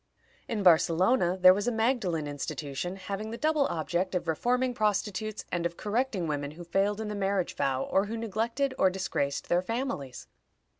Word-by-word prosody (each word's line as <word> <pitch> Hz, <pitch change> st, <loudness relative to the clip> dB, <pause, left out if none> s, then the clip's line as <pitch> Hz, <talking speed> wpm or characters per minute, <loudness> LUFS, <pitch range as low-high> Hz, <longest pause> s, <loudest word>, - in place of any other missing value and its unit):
In 215 Hz, -4 st, -2 dB
Barcelona 180 Hz, +3 st, +4 dB
there 185 Hz, 0 st, +9 dB
was 205 Hz, +4 st, -2 dB
a -, -, +2 dB
Magdalen 220 Hz, -, 0 dB
institution, 145 Hz, +3 st, -4 dB
having 195 Hz, +3 st, -5 dB
the 230 Hz, -, -5 dB
double 305 Hz, -1 st, +2 dB
object 175 Hz, +3 st, -2 dB
of 175 Hz, -, -2 dB
reforming 250 Hz, +10 st, +1 dB
prostitutes 215 Hz, -1 st, -1 dB
and 175 Hz, -1 st, -1 dB
of 170 Hz, 0 st, -2 dB
correcting 215 Hz, -3 st, -1 dB
women 145 Hz, -2 st, -2 dB
who 175 Hz, -, -7 dB
failed 195 Hz, +4 st, 0 dB
in 220 Hz, -, -3 dB
the 210 Hz, -, -3 dB
marriage 195 Hz, -2 st, -1 dB
vow, 135 Hz, -1 st, 0 dB
or 195 Hz, +2 st, +1 dB
who 225 Hz, +2 st, -4 dB
neglected 230 Hz, +5 st, -1 dB
or 190 Hz, -, +5 dB
disgraced 180 Hz, -7 st, -2 dB
their 175 Hz, +1 st, +2 dB
families. 185 Hz, -, -4 dB
195 Hz, 170 wpm, -29 LUFS, 170-225 Hz, -, there